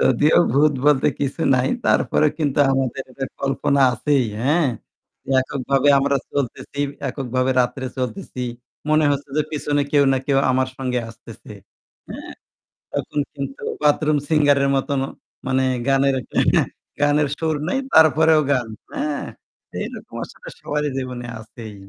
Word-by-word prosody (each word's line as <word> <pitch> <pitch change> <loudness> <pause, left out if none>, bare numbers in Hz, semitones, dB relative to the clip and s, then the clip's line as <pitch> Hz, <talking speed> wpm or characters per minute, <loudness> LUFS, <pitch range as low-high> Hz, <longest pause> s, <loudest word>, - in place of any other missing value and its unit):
যদিও 145 +5 +4
ভূত 145 +2 +4
বলতে 145 -3 +4
কিছু 140 +4 -2
নাই 125 0 +1 0.2
তারপরেও 155 -1 +3
কিন্তু 145 -2 0
আমাদের 135 0 -1
একটা 135 +1 -5 0.2
কল্পনা 140 0 +1
আছেই, 130 +3 +1 0.2
হ্যাঁ? 150 +5 +2 0.7
এককভাবে 135 +1 0
আমরা 140 0 +2 0.2
চলতেছি, 140 +1 -3 0.3
এককভাবে 130 -1 -1
রাত্রে 125 +2 -1
চলতেছি। 130 +2 -4 0.5
মনে 155 0 +4
হচ্ছে 140 0 -2
যে 155 - +3
পিছনে 145 -1 0
কেউ 145 -1 +5
না 130 - +2
কেউ 135 -1 +3
আমার 130 0 +1
সঙ্গে 125 -2 -1
আসতেছে, - - -13 0.6
হ্যাঁ? - - -8 0.6
তখন 145 - -2
কিন্তু 140 -1 -6 0.2
bathroom 150 0 +3
singer-এর 145 -3 +3
মতনও 135 0 -1 0.4
মানে 130 0 +1 0.3
গানের 135 0 +3
একটা - - -16
এহে - - +3
গানের, - - +2 0.3
গানের 145 0 +3
সুর 160 -2 0
নাই 265 - 0 0.2
তারপরেও 160 0 +6
গান, 125 -4 0 0.2
হ্যাঁ? 150 -1 -2 0.6
এইরকম - - -7
আসলে - - -13
সবারই 150 0 -2
জীবনে 125 -2 -5
আছেই। 110 -1 -10
140 Hz, 135 wpm, -21 LUFS, 130-150 Hz, 0.7 s, তারপরেও